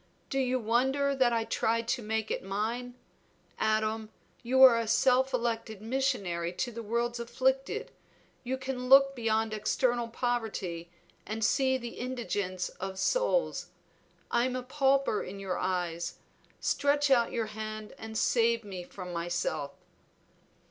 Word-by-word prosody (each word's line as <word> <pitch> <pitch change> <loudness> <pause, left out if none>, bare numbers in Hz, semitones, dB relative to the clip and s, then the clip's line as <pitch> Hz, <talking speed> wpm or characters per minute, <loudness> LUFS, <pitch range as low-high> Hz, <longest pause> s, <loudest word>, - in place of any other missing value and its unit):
Do 270 - +1
you 255 -1 +1
wonder 265 +5 +1
that 255 -2 +3
I 230 -1 +1
tried 230 +1 0
to 250 - 0
make 220 0 -2
it - - -1
mine? 225 +6 -3 0.6
Adam, 220 0 0 0.3
you 260 +2 +4
are 240 -3 +9
a 230 - -2
self 260 +3 +3
elected 230 -3 -2
missionary 215 -8 -1
to 245 +7 -2
the 230 0 -6
world's 235 +2 -1
afflicted; 265 - -1 0.5
you 260 +1 -2
can 260 -1 -4
look 275 0 +7
beyond 220 -2 0
external 240 +2 +1
poverty 220 -8 -3 0.3
and 220 0 -2
see 260 -1 +3
the 240 -2 -8
indigence 205 -7 -2
of 190 0 -5
souls. - - +1 0.6
I 240 +1 +3
am 255 0 -1
a 255 - -3
pauper 270 -3 +2
in 195 +2 -7
your 190 -2 -3
eyes; 175 -2 -2 0.4
stretch 285 0 +2
out 235 -3 +4
your 230 -2 -1
hand 215 0 -6
and 220 0 -6
save 230 0 +2
me 190 -3 -6
from 180 0 -8
myself." 170 -4 -2
235 Hz, 140 wpm, -30 LUFS, 215-260 Hz, 0.6 s, are